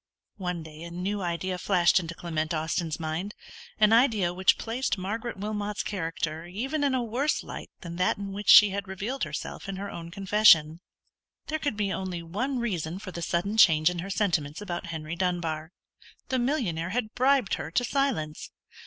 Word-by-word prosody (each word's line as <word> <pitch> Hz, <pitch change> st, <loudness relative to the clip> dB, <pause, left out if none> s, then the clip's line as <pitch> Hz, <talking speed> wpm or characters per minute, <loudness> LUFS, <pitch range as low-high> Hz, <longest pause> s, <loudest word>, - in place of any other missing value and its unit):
One 180 Hz, -4 st, -3 dB
day 155 Hz, 0 st, -11 dB
a 170 Hz, -, -7 dB
new 190 Hz, +4 st, -3 dB
idea 180 Hz, +1 st, -2 dB
flashed 180 Hz, -2 st, +4 dB
into 170 Hz, -1 st, -6 dB
Clement 160 Hz, -1 st, -2 dB
Austin's 160 Hz, +1 st, -2 dB
mind; 165 Hz, +6 st, -3 dB, 0.4 s
an 215 Hz, 0 st, +5 dB
idea 220 Hz, -7 st, +4 dB
which 185 Hz, +1 st, +3 dB
placed 235 Hz, 0 st, -2 dB
Margaret 220 Hz, +5 st, -4 dB
Wilmot's 210 Hz, 0 st, -3 dB
character 165 Hz, -3 st, -3 dB
even 265 Hz, -, -2 dB
in 275 Hz, -2 st, +2 dB
a 250 Hz, -, 0 dB
worse 250 Hz, +7 st, 0 dB
light -, -, -8 dB
than 170 Hz, -1 st, -7 dB
that 180 Hz, -, +2 dB
in 200 Hz, -1 st, -5 dB
which 205 Hz, +1 st, -4 dB
she 210 Hz, -2 st, +10 dB
had 200 Hz, 0 st, -4 dB
revealed 205 Hz, +8 st, -3 dB
herself -, -, -6 dB
in 195 Hz, -, -3 dB
her 200 Hz, +1 st, -5 dB
own 170 Hz, -1 st, -7 dB
confession. 185 Hz, -4 st, +5 dB, 0.7 s
There 315 Hz, 0 st, -1 dB
could 285 Hz, -9 st, -2 dB
be 200 Hz, -2 st, 0 dB
only 180 Hz, -1 st, -4 dB
one 240 Hz, +11 st, -2 dB
reason 180 Hz, -8 st, -2 dB
for 190 Hz, -1 st, -8 dB
the 170 Hz, -, -6 dB
sudden 190 Hz, +6 st, -1 dB
change 160 Hz, -5 st, +6 dB
in 175 Hz, -, -5 dB
her 185 Hz, +3 st, -5 dB
sentiments 170 Hz, -8 st, 0 dB
about 180 Hz, -3 st, -5 dB
Henry 160 Hz, -1 st, -5 dB
Dunbar: 170 Hz, -3 st, -2 dB, 0.6 s
the 260 Hz, -, +1 dB
millionaire 230 Hz, -, -1 dB
had 220 Hz, +1 st, -2 dB
bribed 260 Hz, -4 st, +3 dB
her -, -, -2 dB
to 215 Hz, +9 st, +1 dB
silence! 230 Hz, -, -1 dB
190 Hz, 180 wpm, -27 LUFS, 170-215 Hz, 0.7 s, she